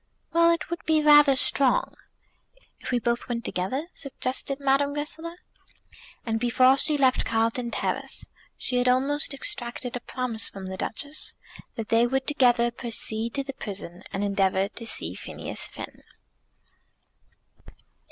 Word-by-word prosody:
"Well, 335 0 +5
it 335 0 0
would 340 - -4
be 310 -1 +3
rather 295 -2 +7
strong." 280 - +2 0.9
"If - - -7
we 250 - +2
both 235 +1 -1
went 235 -1 -3
together?" 255 - -2
suggested 275 -1 -2
Madame 280 +1 +2
Goesler. 320 +3 -4 0.9
And 225 -1 0
before 255 +2 +5
she 305 -2 +1
left 260 -2 +3
Carlton 230 +2 0
Terrace - - -2 0.3
she 250 - 0
had 245 0 +3
almost 275 +4 +1
extracted 245 -2 -3
a - - -2
promise 240 -3 -1
from 195 -1 -8
the 190 0 -5
Duchess 285 +10 -2 0.4
that 225 -3 -5
they 230 +1 +4
would 265 +1 0
together 245 -5 +3
proceed 230 -1 -3
to 275 - 0
the 275 0 -6
prison 190 -6 -6
and 195 - -2
endeavour 195 -1 +1
to 230 +1 -8
see 85 - -1
Phineas - - -4
Finn. - - -9
250 Hz, 140 wpm, -26 LUFS, 225-280 Hz, 0.9 s, rather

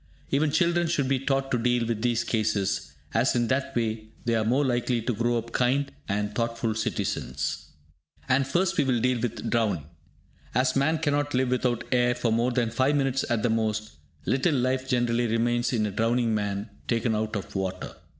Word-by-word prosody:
Even 145 +2 +2
children 170 +2 +2
should 150 -5 0
be 135 0 +1
taught 135 0 -1
to 125 - +2
deal 120 0 +1
with 115 -2 -2
these 120 -1 +1
cases, 105 -3 0 0.2
as 120 +4 +2
in 120 -1 +1
that 130 +1 -1
way 110 -2 -1 0.2
they 115 - +1
are 110 -1 +2
the 110 - 0
more 140 +4 +3
likely 120 -1 +1
to 120 +2 -1
grow 120 +2 +1
up 115 0 -5
kind 135 +4 +1 0.2
and 105 +1 -1
thoughtful 115 0 -1
citizens. 70 - -2 0.6
And 135 0 +2
first 175 +6 +1
we - - +5
will 130 -3 +1
deal 125 +1 +1
with 120 -2 -3
drowning. 105 - +1 0.7
As 130 +1 +2
man 145 +4 +2
cannot 145 -2 0
live 130 0 +2
without 125 -2 0
air 125 -1 +3
for 120 -2 0
more 120 +3 +2
than 120 -2 0
5 130 +5 +2
minutes 135 -1 +1
at 115 -3 0
the 120 - +2
most, 110 -5 -1 0.3
little 135 +4 +2
life 130 +1 0
generally 120 -1 +1
remains 120 +2 +1
in 110 -4 +1
a 105 - -2
drowning 115 +2 +1
man 100 0 -2 0.2
taken 115 -1 +1
out 110 0 -1
of 100 - -5
water. 95 -1 -3
120 Hz, 195 wpm, -26 LUFS, 110-130 Hz, 0.7 s, we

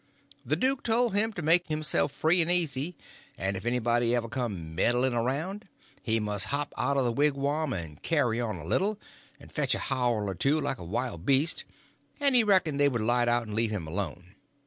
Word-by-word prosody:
The - - 0
duke 260 +1 0
told 235 -1 +1
him 215 +3 +2
to 175 - -5
make 170 +3 +4
himself 155 -2 0
free 170 +5 +3
and 165 +1 +2
easy, 165 -2 +2 0.4
and 95 +2 -2
if 95 +5 -6
anybody 120 0 +1
ever 120 -1 -1
come 105 -10 -4
meddling 120 +8 +1
around, 145 - -2 0.3
he 115 -1 +1
must 105 -2 0
hop 145 +3 -2
out 140 +3 0
of 135 - +2
the 120 - +1
wigwam, 145 +2 0
and 80 -7 -6
carry 125 -8 +1
on 110 -5 -3
a - - -9
little, 205 +2 0 0.4
and - - -15
fetch - - +1
a - - -2
howl 120 -6 -1
or 95 - -2
two 140 - +2
like 135 - -2
a - - -8
wild 100 -1 -3
beast, 140 +4 +2 0.5
and 280 -2 +2
he 245 -2 +6
reckoned 185 -8 +2
they 145 0 +5
would 120 -5 -2
light 120 +1 +2
out 120 0 +2
and 105 -2 -8
leave 115 +1 +1
him 105 -6 -4
alone. 90 +1 -5
130 Hz, 205 wpm, -28 LUFS, 110-160 Hz, 0.5 s, he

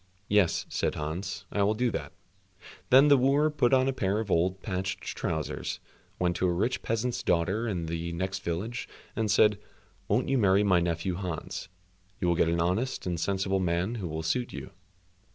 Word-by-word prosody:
"Yes," 105 -4 +3
said - - -1
Hans, 85 +7 -4
"I 105 - 0
will 105 +2 +3
do 125 +2 +1
all - - -4
that." - - -4 0.8
Then 135 +3 +7
the 140 -1 +7
wooer 140 +4 +3
put 125 -5 +2
on 130 0 +4
a 135 - +1
pair 100 -3 0
of 110 -3 -4
old 90 +3 +2
patched 95 -1 -3
trousers, 80 -3 -3 0.4
went 90 -1 +1
to 90 - +1
a - - +2
rich 105 +9 0
peasant's 115 +2 -1
daughter 95 +7 +1
in 90 -6 -2
the 85 +1 -3
next 95 +3 -2
village, 100 +8 -3 0.3
and 110 -1 0
said, 105 0 +4 0.5
"Won't 105 +6 +1
you 135 -1 +2
marry 100 -1 +4
my 95 -3 +4
nephew 85 +1 -1
Hans—you 90 +1 -6
will 85 - +4
get 80 0 +2
an 85 0 +1
honest 95 +10 0
and 90 -2 -2
sensible 95 +2 0
man 90 +4 0
who 105 -7 -4
will 80 0 -4
suit 120 +10 -1
you?" - - -7
95 Hz, 190 wpm, -28 LUFS, 85-110 Hz, 0.8 s, Then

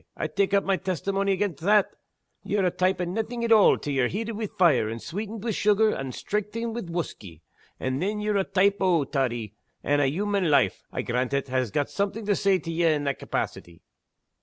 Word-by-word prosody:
I - - -2
tak' 195 +5 +1
up 200 - +3
my 195 -1 +1
testimony 195 +2 -1
against 190 -6 -2
that. 205 +3 +3 0.5
Ye're 205 -2 0
a 180 - +2
type 185 +1 +1
o' - - 0
naething 225 +6 -3
at 230 - 0
all 215 -2 +6
till 145 - -4
ye're 130 -2 +2
heated 220 - -3
wi' 215 0 -3
fire, 165 - +3
and 115 +1 -5
sweetened 210 - -6
wi' 230 - -1
sugar, 210 +1 +3
and 135 -2 -4
strengthened 215 +3 -3
wi' 240 - -3
whusky; 95 - -6 0.4
and 130 +2 -2
then 210 +3 -1
ye're 210 -1 0
a 195 - +2
type 200 +1 +2
o' 180 -5 +3
toddy 120 -6 -2 0.3
and 145 0 +2
human 190 +6 0
life 135 -10 +3
(I - - -3
grant 125 +2 -1
it) 140 -1 -2
has 130 -2 0
got 145 +7 -1
something 205 +2 -2
to 205 -1 +2
say 195 -1 +3
to 165 -2 -6
ye 170 +1 0
in 150 -1 0
that 140 -1 -2
capacity!" 85 -1 -5
185 Hz, 210 wpm, -26 LUFS, 140-205 Hz, 0.5 s, all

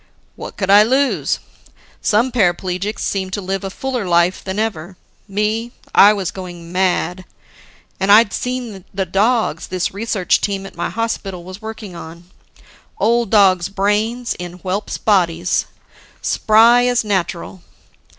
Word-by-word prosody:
"What - - -9
could 195 -1 0
I 205 +1 +8
lose? 265 +5 +1 0.6
Some 230 +5 +2
paraplegics 190 -1 0
seem 190 -1 -2
to 190 - -3
live 195 0 -3
a 195 - -3
fuller 250 0 -4
life 175 +1 +2
than 190 +1 -4
ever. 190 -5 -3 0.3
Me, 215 +4 -2 0.2
I 205 - +8
was 195 -4 -2
going 175 -3 -9
mad. 185 0 0 0.8
And 195 +1 +2
I'd 210 0 +6
seen 245 -6 -4
the 190 -1 -2
dogs 205 -2 0
this 185 -1 -2
research 205 -3 0
team 195 -1 -2
at - - -11
my 170 - -2
hospital 200 -6 -3
was 185 +3 -10
working 220 -4 -8
on 170 +2 -11 0.7
old 235 0 +1
dogs' 190 -4 +4
brains 210 +5 0
in 175 -1 -6
whelps' 195 +2 -3
bodies, 180 -4 +1 0.5
spry 230 +3 +4
as 245 -2 +1
natural. 185 -2 -3
195 Hz, 140 wpm, -18 LUFS, 185-220 Hz, 0.8 s, I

